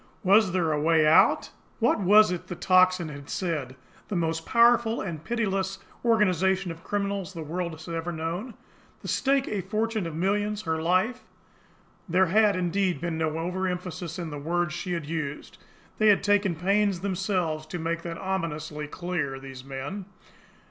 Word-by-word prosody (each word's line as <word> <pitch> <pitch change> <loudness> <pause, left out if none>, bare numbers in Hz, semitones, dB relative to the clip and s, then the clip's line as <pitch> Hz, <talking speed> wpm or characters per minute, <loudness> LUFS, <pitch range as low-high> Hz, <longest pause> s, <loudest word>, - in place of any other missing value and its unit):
Was 195 0 +5
there 175 -3 +1
a 150 -1 0
way 160 0 +4
out? 155 +1 +4 0.3
What 230 -1 +2
was 210 +1 +6
it 180 - -4
the 180 - -5
Tocsin 185 -2 +3
had 140 -1 -10
said 150 -8 -3 0.3
"the 205 - -4
most 165 -1 -1
powerful 235 -1 +4
and 165 -5 -5
pitiless 195 -2 -1 0.3
organisation 190 -5 +2
of 165 +1 -10
criminals 200 -2 -2
the 165 -3 -6
world 170 +2 -3
has 160 +1 -11
ever 165 0 -3
known 170 +9 -4 0.5
the - - -6
stake 275 0 +1
a 205 -2 -2
fortune 215 0 -1
of 160 - -6
millions 205 +4 0
her 160 -2 -1
life!" 185 +9 +1 0.9
There 185 +3 +4
had, 210 -2 +5
indeed, 185 -2 0
been 165 0 -3
no 160 -1 -1
overemphasis 180 -1 -3
in 170 -3 -5
the 145 - -5
words 170 +2 -1
she 180 +2 -3
had 165 -4 -3
used! 150 -2 -5 0.4
They 215 - +4
had 205 -2 +5
taken 205 -3 +2
pains 195 +2 +1
themselves 185 -5 -1
to 180 - -5
make 165 0 -2
that 165 -1 -6
ominously 155 -5 -3
clear, 155 -5 -3
these 135 -1 -10
men! 135 +9 -6
180 Hz, 165 wpm, -27 LUFS, 160-200 Hz, 0.9 s, was